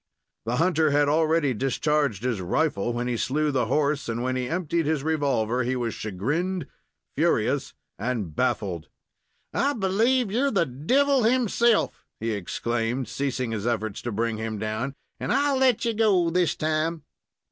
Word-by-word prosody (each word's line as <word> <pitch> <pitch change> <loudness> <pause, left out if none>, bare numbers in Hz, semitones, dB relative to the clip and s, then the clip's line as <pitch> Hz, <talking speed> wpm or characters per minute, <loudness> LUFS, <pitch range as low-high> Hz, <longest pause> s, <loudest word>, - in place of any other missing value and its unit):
The 120 - 0
hunter 160 0 +3
had 145 0 +3
already 155 -2 +2
discharged 135 -1 0
his 120 -6 -1
rifle 120 - 0
when 120 +1 -2
he 120 -1 -1
slew 150 +5 0
the 125 -4 0
horse, 145 +1 0
and 115 +1 -2
when 130 0 -1
he 125 -1 -2
emptied 170 -2 -1
his 155 -3 0
revolver, 135 -7 +1
he 125 +2 0
was 120 -3 -2
chagrined, 150 - -2 0.5
furious, - - +1 0.2
and 105 -8 -3
baffled. 85 -6 -1 0.7
"I 280 +1 +1
believe 225 +3 +1
you're 260 +6 +2
the 195 -9 +2
devil 255 - +2
himself!" 235 -1 +2 0.2
he 115 +1 -2
exclaimed, 115 +5 -2
ceasing 130 -3 -2
his 110 0 -3
efforts 110 -3 -2
to 120 - -4
bring 115 +1 -1
him 110 -1 -3
down, 110 +6 -3 0.2
"and - - -2
I'll 280 -1 +2
let 260 -4 +3
you 230 - +1
go 200 -6 +3
this 180 -1 +2
time!" 155 +1 -1
140 Hz, 160 wpm, -25 LUFS, 115-175 Hz, 0.7 s, hunter